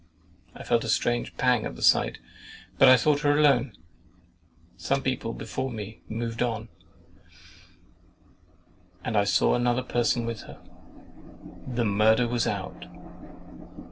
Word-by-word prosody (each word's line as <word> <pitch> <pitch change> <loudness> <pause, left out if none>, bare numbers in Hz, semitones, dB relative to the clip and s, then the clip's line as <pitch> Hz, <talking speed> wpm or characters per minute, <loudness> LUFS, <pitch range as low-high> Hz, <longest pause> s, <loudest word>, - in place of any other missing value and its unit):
I - - -9
felt 120 -1 +1
a 115 - -5
strange 120 +1 -1
pang 125 -3 +2
at - - -5
the - - -8
sight, - - +3 0.6
but - - +7
I 130 - +8
thought 145 +4 +2
her 145 -1 +2
alone. 140 -4 +3 1.0
Some 135 0 -2
people 130 -3 -2
before 130 +3 -5
me 110 -2 -8
moved 115 +1 -4
on, 115 -2 -2 2.3
and 110 - -3
I 100 -1 +3
saw 100 - +2
another 120 +1 +1
person 120 -1 0
with 115 -2 -4
her. - - -12 1.1
THE 120 -2 -1
MURDER 110 +3 +3
WAS 120 0 -1
OUT. - - -5
120 Hz, 130 wpm, -26 LUFS, 115-130 Hz, 2.3 s, I